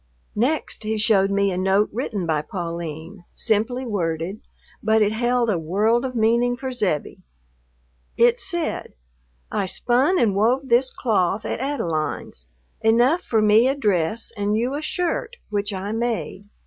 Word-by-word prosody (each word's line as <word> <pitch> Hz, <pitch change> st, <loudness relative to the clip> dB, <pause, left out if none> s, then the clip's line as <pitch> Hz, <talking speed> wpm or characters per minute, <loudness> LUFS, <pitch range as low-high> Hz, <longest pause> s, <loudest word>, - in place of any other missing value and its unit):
Next 265 Hz, +9 st, -1 dB
he 220 Hz, 0 st, -2 dB
showed 205 Hz, -2 st, +3 dB
me 200 Hz, 0 st, +1 dB
a 180 Hz, -, -2 dB
note 195 Hz, +2 st, +2 dB
written 215 Hz, -6 st, -3 dB
by 155 Hz, -2 st, 0 dB
Pauline, 170 Hz, +1 st, -6 dB
simply 225 Hz, +4 st, 0 dB
worded, 175 Hz, -2 st, -2 dB, 0.4 s
but 220 Hz, 0 st, +3 dB
it 205 Hz, -, +1 dB
held 240 Hz, +2 st, +1 dB
a 200 Hz, -6 st, +1 dB
world 210 Hz, +9 st, +1 dB
of 255 Hz, -1 st, -4 dB
meaning 235 Hz, +2 st, +2 dB
for 265 Hz, 0 st, -4 dB
Zebbie. 195 Hz, -, -2 dB, 1.0 s
It 480 Hz, +1 st, +4 dB
said, 345 Hz, -6 st, -3 dB, 0.6 s
"I 190 Hz, -, -1 dB
spun 255 Hz, -, +2 dB
and 225 Hz, -, +3 dB
wove 245 Hz, +7 st, +1 dB
this 250 Hz, +2 st, +3 dB
cloth 210 Hz, -3 st, 0 dB
at -, -, -3 dB
Adeline's, 165 Hz, -, -3 dB, 0.3 s
enough 240 Hz, +10 st, +3 dB
for 220 Hz, -10 st, +1 dB
me 215 Hz, +3 st, +5 dB
a 270 Hz, -, +1 dB
dress 205 Hz, -, 0 dB
and 205 Hz, 0 st, 0 dB
you 245 Hz, +4 st, -1 dB
a 290 Hz, -, -3 dB
shirt, 360 Hz, +8 st, -2 dB, 0.2 s
which 205 Hz, 0 st, -1 dB
I 195 Hz, +1 st, -4 dB
made. 225 Hz, -3 st, -3 dB
220 Hz, 150 wpm, -22 LUFS, 195-245 Hz, 1.0 s, me